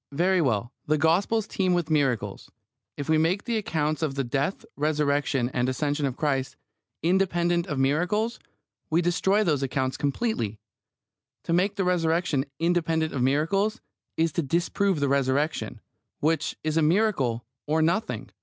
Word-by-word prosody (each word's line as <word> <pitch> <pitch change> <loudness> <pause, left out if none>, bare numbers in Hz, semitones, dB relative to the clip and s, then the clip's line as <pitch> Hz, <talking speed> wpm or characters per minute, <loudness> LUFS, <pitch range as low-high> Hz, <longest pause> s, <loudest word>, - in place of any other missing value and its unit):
Very 180 +4 +2
well. 120 -4 0
The 155 +1 +3
Gospels 190 +8 +2
teem 185 -3 +1
with 170 -2 -1
miracles. 135 -7 0 0.5
If 145 - -4
we 160 0 +3
make 175 +5 +1
the 235 -2 -1
accounts 155 -7 -1
of 150 -4 -1
the 135 - 0
death, 140 +8 -2
Resurrection, 145 -4 +1
and 125 +1 +1
Ascension 145 +2 0
of 130 - -5
Christ 135 -4 -1 0.5
"independent 175 -1 +1
of 150 - -3
miracles," 180 - +1 0.5
we 165 +2 +2
destroy 190 +4 +2
those 150 -8 +1
accounts 130 -1 -1
completely. 140 - -1 0.9
To 170 - -1
make 195 +4 +2
the 200 - 0
Resurrection 165 -5 +1
"independent 165 -2 +1
of 135 - -2
miracles" 165 - +1 0.4
is 165 0 +2
to 170 - 0
disprove 170 +4 0
the 140 - +1
Resurrection, 140 +3 0 0.4
which 160 +2 0
is 155 0 0
a - - +4
miracle 150 - +1 0.2
or 160 +1 +2
nothing. 185 +8 -1
160 Hz, 150 wpm, -26 LUFS, 140-180 Hz, 0.9 s, a